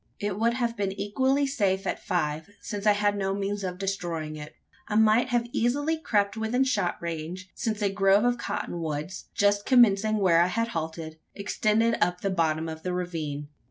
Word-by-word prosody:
It 205 -1 -2
would 235 +1 +2
have 235 -2 -1
been 200 -3 -1
equally 260 +8 +1
safe 200 -8 0
at - - -3
five: 155 -1 -1
since 205 -1 -4
I 210 - +7
had 205 0 +1
no 195 -1 -1
means 200 0 -2
of 180 -1 -3
destroying 175 -5 -3
it. 150 0 -9 0.3
I 210 - -3
might 220 +3 +4 0.2
easily 285 +7 +1
have 315 - -19
crept 200 -2 +1
within 225 +4 +1
shot 260 -9 0
range 170 +3 -5
since 215 -2 -2
a 200 - +2
grove 195 +1 +4
of 245 0 +1
cotton 175 -6 -4
woods, 155 +3 -4
just 205 0 +3
commencing 215 -4 +4
where 175 -4 +4
I 175 - +4
had 230 +5 -1
halted, 160 -4 -5 0.2
extended 215 +3 +1
up 180 +1 -1
the 195 - 0
bottom 160 -2 0
of 160 0 -6
the 180 +1 -3
ravine. 155 -5 -4
200 Hz, 190 wpm, -27 LUFS, 175-220 Hz, 0.3 s, I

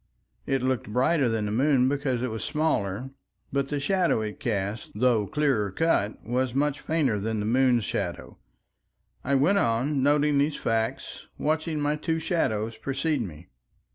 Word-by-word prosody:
It 135 -2 0
looked 130 -5 -1
brighter 130 +3 +2
than 110 -2 -1
the 105 - -2
moon 130 +2 +3
because 135 -3 -1
it 130 - -2
was 110 - -4
smaller, 135 -6 -1 0.4
but 140 -1 0
the 145 - -1
shadow 175 - +1
it 105 -1 -5
cast, 105 -3 -3
though 115 -4 +3
clearer 135 -8 +1
cut, 105 - 0
was 125 +2 -1
much 145 +1 +1
fainter 145 -10 0
than 110 +2 -2
the 105 - -2
moon's 120 -1 +3
shadow... - - -4 0.8
I 140 +1 +1
went 175 +10 +4
on 130 +4 +1
noting 145 +1 +3
these 145 +1 +1
facts, 115 0 -2
watching 155 +1 -1
my 145 +1 0
two 160 +2 -1
shadows 115 - -1
precede 135 +4 -1
me. 85 -5 -8
130 Hz, 160 wpm, -26 LUFS, 110-150 Hz, 0.8 s, went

